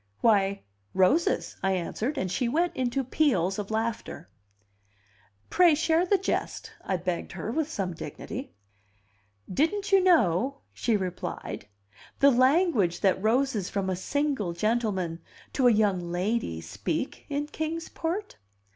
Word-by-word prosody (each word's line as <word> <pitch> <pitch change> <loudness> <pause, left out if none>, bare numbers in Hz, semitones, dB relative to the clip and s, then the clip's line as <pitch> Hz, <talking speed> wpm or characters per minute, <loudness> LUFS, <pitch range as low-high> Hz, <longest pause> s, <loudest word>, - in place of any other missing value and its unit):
"Why, 200 -3 +3 0.3
roses," 300 - +2
I 190 0 +1
answered; 215 - -2
and 185 -8 -1
she 235 +5 0
went 340 +6 +1
into 260 +1 0
peals 230 - +1
of 205 - -4
laughter. 220 - -3 1.2
"Pray 350 -3 +6
share 330 +3 +2
the 400 - +4
jest," 380 - -3
I 190 - -1
begged 175 0 -3
her 225 - -4
with 315 +3 -1
some 195 - -3
dignity. 210 - -7 1.0
"Didn't 395 - 0
you 390 -1 +6
know," 270 - +3
she 230 -3 +1
replied, 185 - -5 0.5
"the 280 0 +6
language 255 - +3
that 190 -2 +2
roses 225 -2 +1
from 195 -2 -1
a - - 0
single 265 - -1
gentleman 190 -4 -1 0.3
to 260 -3 +3
a - - +7
young 195 -5 +1
lady 180 - -1
speak 100 - -4
in 290 0 -1
Kings 315 +2 -4
Port?" 360 +6 -4
230 Hz, 135 wpm, -27 LUFS, 190-300 Hz, 1.2 s, a